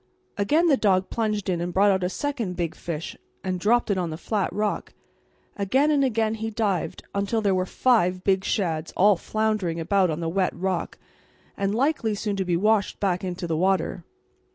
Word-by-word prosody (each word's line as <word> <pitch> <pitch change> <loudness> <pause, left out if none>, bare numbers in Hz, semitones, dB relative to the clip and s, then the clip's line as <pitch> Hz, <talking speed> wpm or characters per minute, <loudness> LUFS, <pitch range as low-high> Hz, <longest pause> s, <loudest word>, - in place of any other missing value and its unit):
Again 295 +12 +2
the 295 -5 +4
dog 190 -4 +2
plunged 215 -3 -1
in 175 -2 0
and 175 +1 -2
brought 200 +3 +4
out 190 -1 0
a 180 - +1
second 235 -4 -3
big 170 -2 -2
fish 165 -1 -5 0.3
and 185 -1 -2
dropped 225 +3 +2
it 190 - +1
on 175 -2 -1
the 155 - -5
flat 205 +2 -1
rock, 210 0 -2 0.6
and - - -7
again 275 +8 +3
and 285 -2 +3
again 225 -4 +1
he 225 0 -3
dived, 200 -7 -2
until 200 +3 0
there 200 -3 +2
were 185 0 0
five 185 -8 +2
big 190 -1 +2
shads 165 -8 -1
all 205 +2 +6
floundering 215 -4 -1
about 185 +2 +2
on 155 0 -2
the 165 - -2
wet 185 +2 0
rock 190 0 -2 0.6
and 200 +1 -1
likely 245 -4 +1
soon 205 0 -2
to 190 - -1
be 175 -1 +1
washed 210 +1 +1
back 185 -2 0
into 180 -1 -4
the 165 -1 -1
water. 185 0 0
195 Hz, 200 wpm, -25 LUFS, 180-220 Hz, 0.6 s, all